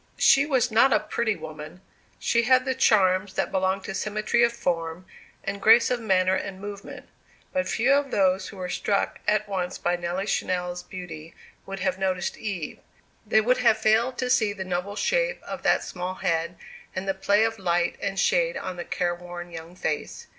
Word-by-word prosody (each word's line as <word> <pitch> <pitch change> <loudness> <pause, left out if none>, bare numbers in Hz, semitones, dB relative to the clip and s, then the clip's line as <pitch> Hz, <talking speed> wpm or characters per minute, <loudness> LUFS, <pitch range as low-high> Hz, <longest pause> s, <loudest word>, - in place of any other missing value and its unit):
She 280 +1 +5
was 255 -4 +1
not 235 +5 +5
a - - +4
pretty 220 -3 -1
woman. 155 +1 -9 0.4
She 235 - +2
had 255 +2 +4
the 260 - 0
charms 190 -6 +3
that - - -1
belong 190 0 0
to 195 - -6
symmetry 215 +3 0
of 235 - +4
form, 165 -3 -3 0.4
and 200 0 -4
grace 230 +4 +6
of 250 - +1
manner 190 -4 +2
and 190 0 -3
movement. 200 0 -8 0.5
But 275 -1 0
few 245 +5 +3
of 280 0 +2
those 190 -3 +2
who 200 - -10
were 180 -1 -4
struck 200 +3 -1
at 210 0 +2
once 185 -2 -3
by 175 0 0
Nelly 175 +3 -3
Channell's 180 -3 -2
beauty 170 -4 -9 0.3
would 195 0 -6
have 185 0 -1
noticed 185 -2 -1
Eve. 190 -8 -5 0.5
They 220 +1 +4
would 250 +4 +2
have 235 -3 +4
failed 230 +4 +2
to 250 -1 -1
see 220 -5 +3
the 190 -2 -6
noble 185 +2 -3
shape - - 0
of - - -6
that - - +2
small 180 0 -5
head, 170 0 -1 0.4
and 185 +1 -4
the 195 - +1
play 200 +2 +2
of 225 -1 -1
light 175 -1 +1
and 195 -1 -2
shade - - +2
on 180 - -5
the 175 - -5
careworn 175 0 -4
young 165 +1 -9
face. 155 -4 -3
195 Hz, 190 wpm, -25 LUFS, 180-225 Hz, 0.5 s, grace